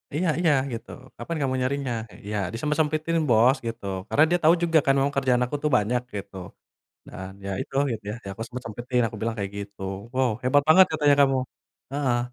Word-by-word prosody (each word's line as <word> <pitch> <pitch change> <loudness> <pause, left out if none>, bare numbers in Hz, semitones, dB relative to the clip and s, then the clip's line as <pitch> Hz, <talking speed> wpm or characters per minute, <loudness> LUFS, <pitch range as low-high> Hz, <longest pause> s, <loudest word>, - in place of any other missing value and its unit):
Iya 180 +4 0
iya, 170 -3 +3 0.2
gitu. 115 +1 -7 0.3
"Kapan 170 - -5
kamu 135 -2 0
nyarinya?" 130 -1 -1 0.3
Iya 105 +1 -3 0.2
"Disempet-sempetin 155 +5 0
bos," 120 +3 +5
gitu, 115 -2 -6 0.2
karena 150 - +4
dia 175 0 +2
tahu 160 +2 +6
juga 165 -2 +4
kan 135 - +4
memang 140 +1 +2
kerjaan 130 -2 +2
aku 125 +4 -3
tuh - - +3
banyak, 120 +3 0
gitu. 100 0 -7 0.7
Dan, 95 0 -8
ya - - -3
itu, - - -13 0.2
gitu 110 -3 -4
ya - - -3 0.2
"Aku 100 +3 -6
sempet-sempetin," 125 0 -3
aku 110 -1 -7
bilang 115 0 -1
kayak 100 -1 -3
gitu, 100 -1 -8 0.3
"Wow 130 -1 +2
hebat 130 +3 +3
banget" 185 +4 +8
katanya 150 -2 +4
kamu 135 -1 +3 0.6
heeh. 135 -4 +1
130 Hz, 185 wpm, -25 LUFS, 115-150 Hz, 0.7 s, banget